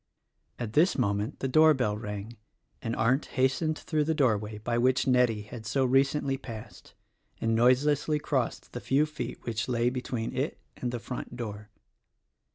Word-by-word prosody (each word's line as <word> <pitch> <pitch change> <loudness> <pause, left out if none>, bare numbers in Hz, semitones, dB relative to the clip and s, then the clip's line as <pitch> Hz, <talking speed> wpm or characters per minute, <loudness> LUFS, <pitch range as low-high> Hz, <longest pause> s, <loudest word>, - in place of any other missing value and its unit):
At 115 -3 -5
this 165 +7 +4
moment 105 +1 -1
the 135 - 0
doorbell 135 -6 +4
rang, 105 +1 -6 0.5
and 115 -2 -2
Arndt 130 +6 +2
hastened 135 +5 +2
through 155 -2 0
the 160 +1 +1
doorway 110 -6 +1
by 120 +3 -1
which 130 +1 +3
Nettie 125 -5 +3
had 110 +2 -9
so 135 +3 +1
recently 135 +1 +2
passed 115 -5 -10 0.4
and 115 0 +1
noiselessly 140 +6 +3
crossed 135 -4 -2
the 120 - -5
few 140 +3 +2
feet 155 0 -5
which 110 -2 -2
lay 120 0 +2
between 125 -3 -3
it - - -1 0.2
and 125 - -3
the 120 - -2
front 125 +1 -6
door. 105 -3 -6
125 Hz, 160 wpm, -29 LUFS, 115-135 Hz, 0.5 s, this